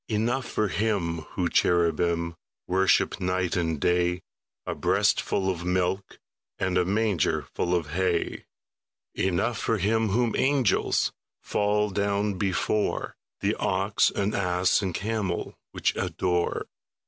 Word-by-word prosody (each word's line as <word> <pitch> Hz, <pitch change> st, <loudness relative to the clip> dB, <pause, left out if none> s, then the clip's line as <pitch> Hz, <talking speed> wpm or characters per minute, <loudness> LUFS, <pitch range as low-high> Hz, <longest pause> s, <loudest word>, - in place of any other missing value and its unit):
Enough 120 Hz, +4 st, 0 dB
for 105 Hz, -1 st, 0 dB
Him 95 Hz, -6 st, 0 dB, 0.2 s
whom 90 Hz, -2 st, 0 dB
cherubim 85 Hz, 0 st, +2 dB, 0.3 s
Worship 95 Hz, 0 st, +2 dB
night 90 Hz, 0 st, 0 dB
and 80 Hz, -4 st, 0 dB
day, 90 Hz, +1 st, +1 dB, 0.4 s
A -, -, -2 dB
breastful 95 Hz, -, +1 dB
of 90 Hz, -2 st, -1 dB
milk 90 Hz, +2 st, -1 dB, 0.4 s
And 95 Hz, -1 st, -1 dB
a 90 Hz, -1 st, +3 dB
mangerful 95 Hz, -3 st, 0 dB
of 80 Hz, -4 st, -2 dB
hay; 90 Hz, 0 st, -1 dB, 0.7 s
Enough 95 Hz, +5 st, 0 dB
for 115 Hz, -, 0 dB
Him 110 Hz, +3 st, +1 dB
whom 115 Hz, +3 st, +1 dB
angels 135 Hz, -6 st, +2 dB, 0.3 s
Fall 105 Hz, 0 st, +1 dB
down 100 Hz, +1 st, 0 dB
before, 100 Hz, +2 st, 0 dB, 0.3 s
The 100 Hz, +2 st, +1 dB
ox 100 Hz, 0 st, +2 dB
and 100 Hz, +1 st, -1 dB
ass 90 Hz, 0 st, +2 dB
and 95 Hz, -4 st, -2 dB
camel 105 Hz, -4 st, -2 dB, 0.2 s
Which -, -, 0 dB
adore. 90 Hz, -1 st, -1 dB
95 Hz, 120 wpm, -26 LUFS, 90-105 Hz, 0.7 s, a